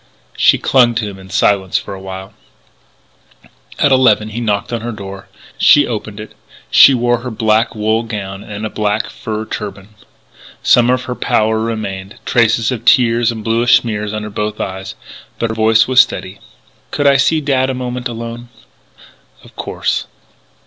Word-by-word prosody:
She -, -, +4 dB
clung 120 Hz, -3 st, +3 dB
to 110 Hz, -2 st, -1 dB
him 100 Hz, -1 st, -9 dB
in 95 Hz, 0 st, -14 dB
silence 95 Hz, -1 st, +1 dB
for -, -, -6 dB
a 95 Hz, -, -9 dB
while. 95 Hz, 0 st, -8 dB, 1.4 s
At 145 Hz, -, +2 dB
eleven 115 Hz, -5 st, +3 dB
he 115 Hz, +3 st, -5 dB
knocked 105 Hz, 0 st, -2 dB
on 115 Hz, -, -2 dB
her 120 Hz, +1 st, -4 dB
door. 100 Hz, -2 st, -9 dB, 0.3 s
She -, -, +6 dB
opened -, -, -5 dB
it. -, -, -9 dB, 0.4 s
She 135 Hz, -, +7 dB
wore 120 Hz, -1 st, +1 dB
her 125 Hz, +1 st, -6 dB
black 110 Hz, +1 st, +1 dB
wool 110 Hz, +1 st, 0 dB
gown 100 Hz, -3 st, -6 dB
and 105 Hz, +1 st, -6 dB
a -, -, -3 dB
black 105 Hz, +1 st, -1 dB
fur 110 Hz, 0 st, -5 dB
turban. 100 Hz, -3 st, -7 dB, 0.7 s
Some 120 Hz, 0 st, +4 dB
of 125 Hz, 0 st, +1 dB
her 125 Hz, -, -4 dB
pallor 110 Hz, -2 st, 0 dB
remained, 110 Hz, -3 st, -5 dB
traces 115 Hz, 0 st, +2 dB
of 120 Hz, -3 st, -4 dB
tears 120 Hz, -1 st, +3 dB
and 110 Hz, -2 st, -7 dB
bluish 115 Hz, +2 st, +4 dB
smears 105 Hz, -3 st, -4 dB
under 105 Hz, 0 st, -5 dB
both 105 Hz, +1 st, -4 dB
eyes. 95 Hz, 0 st, -5 dB, 0.4 s
But 115 Hz, -1 st, -2 dB
her -, -, -5 dB
voice 110 Hz, 0 st, +3 dB
was 130 Hz, -1 st, +6 dB
steady. -, -, -4 dB, 0.5 s
"Could 145 Hz, -, -2 dB
I 140 Hz, -1 st, +5 dB
see 155 Hz, +4 st, +2 dB
Dad 135 Hz, -3 st, 0 dB
a 130 Hz, -, -2 dB
moment 125 Hz, 0 st, -4 dB
alone?" 115 Hz, 0 st, -7 dB, 0.9 s
"Of -, -, -18 dB
course." -, -, -3 dB
110 Hz, 170 wpm, -16 LUFS, 105-120 Hz, 1.4 s, She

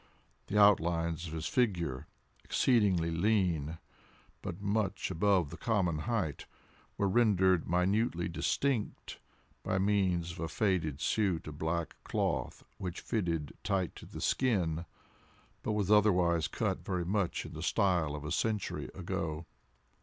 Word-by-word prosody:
The 105 Hz, -, -1 dB
outlines 85 Hz, -4 st, +3 dB
of 80 Hz, -, -7 dB
his 80 Hz, -1 st, -4 dB
figure, 85 Hz, -, 0 dB, 0.4 s
exceedingly 100 Hz, -9 st, +2 dB
lean, 85 Hz, -4 st, +1 dB, 0.6 s
but 85 Hz, -, -5 dB
much 100 Hz, -1 st, -1 dB
above 90 Hz, -3 st, +2 dB
the 85 Hz, -, -7 dB
common 95 Hz, -9 st, 0 dB
height, 105 Hz, -, -2 dB, 0.5 s
were 100 Hz, -, +2 dB
rendered 95 Hz, -5 st, +3 dB
minutely 90 Hz, +1 st, +1 dB
distinct, 115 Hz, +7 st, -1 dB, 0.4 s
by 95 Hz, -, -1 dB
means 95 Hz, -4 st, +1 dB
of 85 Hz, -, -10 dB
a 80 Hz, -, -2 dB
faded 80 Hz, -7 st, 0 dB
suit 95 Hz, -7 st, +1 dB
of 75 Hz, -1 st, -8 dB
black 80 Hz, +1 st, -2 dB
cloth -, -, -2 dB, 0.2 s
which 90 Hz, -1 st, -4 dB
fitted 85 Hz, -, -2 dB
tight 95 Hz, -4 st, -1 dB
to -, -, -11 dB
the -, -, -8 dB
skin, 85 Hz, -10 st, +1 dB, 0.8 s
but 110 Hz, -, -1 dB
was 105 Hz, -1 st, 0 dB
otherwise 90 Hz, -6 st, +4 dB
cut -, -, -2 dB
very 90 Hz, -3 st, -2 dB
much 100 Hz, -1 st, -1 dB
in -, -, -9 dB
the -, -, -6 dB
style 85 Hz, -6 st, +1 dB
of 75 Hz, 0 st, -7 dB
a 75 Hz, -, -4 dB
century 105 Hz, +3 st, -1 dB
ago. 85 Hz, -4 st, -3 dB
90 Hz, 135 wpm, -32 LUFS, 85-105 Hz, 0.8 s, otherwise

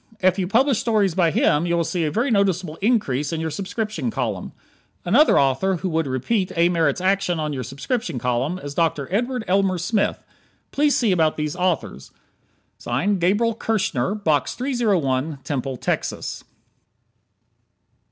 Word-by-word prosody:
If 185 Hz, -1 st, +2 dB
you 185 Hz, -, 0 dB
publish 250 Hz, +4 st, +3 dB
stories 210 Hz, -6 st, +1 dB
by 170 Hz, -1 st, +3 dB
him 155 Hz, +1 st, +2 dB
you 170 Hz, 0 st, +1 dB
will 170 Hz, -, +2 dB
see 170 Hz, 0 st, -1 dB
a -, -, 0 dB
very 240 Hz, -, 0 dB
noticeable 185 Hz, -6 st, +1 dB
increase 190 Hz, -, 0 dB
in 165 Hz, -, -2 dB
your 160 Hz, 0 st, -2 dB
subscription 195 Hz, -, -3 dB
column. -, -, -3 dB, 0.5 s
Another 240 Hz, -, +5 dB
author 140 Hz, +8 st, +2 dB
who 185 Hz, +2 st, -3 dB
would 160 Hz, -2 st, 0 dB
repeat 185 Hz, -, -1 dB
A. 170 Hz, +1 st, +4 dB
Merritt's 165 Hz, -2 st, +1 dB
action 190 Hz, -2 st, +1 dB
on 150 Hz, -1 st, -2 dB
your 130 Hz, -, -3 dB
subscription 140 Hz, -, -3 dB
column 125 Hz, +8 st, -1 dB
is 145 Hz, -6 st, -7 dB
Dr. 155 Hz, -4 st, 0 dB
Edward 245 Hz, +3 st, -1 dB
Elmer 190 Hz, 0 st, +2 dB
Smith. 200 Hz, +4 st, -1 dB, 0.5 s
Please 290 Hz, 0 st, +2 dB
see 230 Hz, -5 st, +2 dB
about 160 Hz, -4 st, +2 dB
these 150 Hz, 0 st, -2 dB
authors. 170 Hz, -, -2 dB, 0.7 s
Gabriel 195 Hz, -, +1 dB
Kirschner, 205 Hz, -, -1 dB
Box 155 Hz, -10 st, 0 dB
301, 175 Hz, -, 0 dB
Temple, 135 Hz, -2 st, -3 dB
Texas. -, -, -3 dB
180 Hz, 150 wpm, -22 LUFS, 150-205 Hz, 0.7 s, Another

